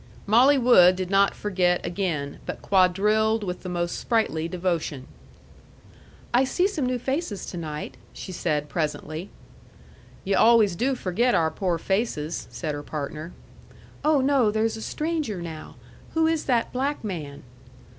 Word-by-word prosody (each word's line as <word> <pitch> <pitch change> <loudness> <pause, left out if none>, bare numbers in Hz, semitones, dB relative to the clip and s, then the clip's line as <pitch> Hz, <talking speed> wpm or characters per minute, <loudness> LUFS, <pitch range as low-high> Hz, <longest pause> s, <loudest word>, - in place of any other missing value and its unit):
Molly 255 +7 +5
Wood 185 -8 +6
did 185 0 -4
not 195 0 +3
forget 180 -3 0
again, 165 -7 -3
but - - -6
quadrilled 210 +4 +3
with 180 -2 -4
the 185 - -6
most 175 -1 -2
sprightly 215 -9 0
devotion. 170 -6 -2 1.3
"I 250 +2 +5
see 355 +8 +1
some 310 -11 -2
new 250 0 0
faces 265 - -3
to 175 - -7
night," 155 -2 -6
said 165 -5 -2
she, - - -18
presently. 155 +2 -3 0.9
"Yu' 195 0 0
always 225 -5 +5
do 260 +7 0
forget 235 +4 +1
our 160 -1 +2
poor 175 +1 -1
faces," 170 -4 -2
said 135 +6 -4
her 145 - -5
partner. 155 +2 -6 0.7
"Oh, 300 -2 +3
no! 265 -4 +3
There's 220 +1 0
a 220 - -7
stranger 305 - -2
now. 160 -2 -8 0.4
Who 320 0 +3
is 320 -1 0
that 240 -3 0
black 275 +2 -2
man?" 155 -9 -6
195 Hz, 145 wpm, -25 LUFS, 170-240 Hz, 1.3 s, Wood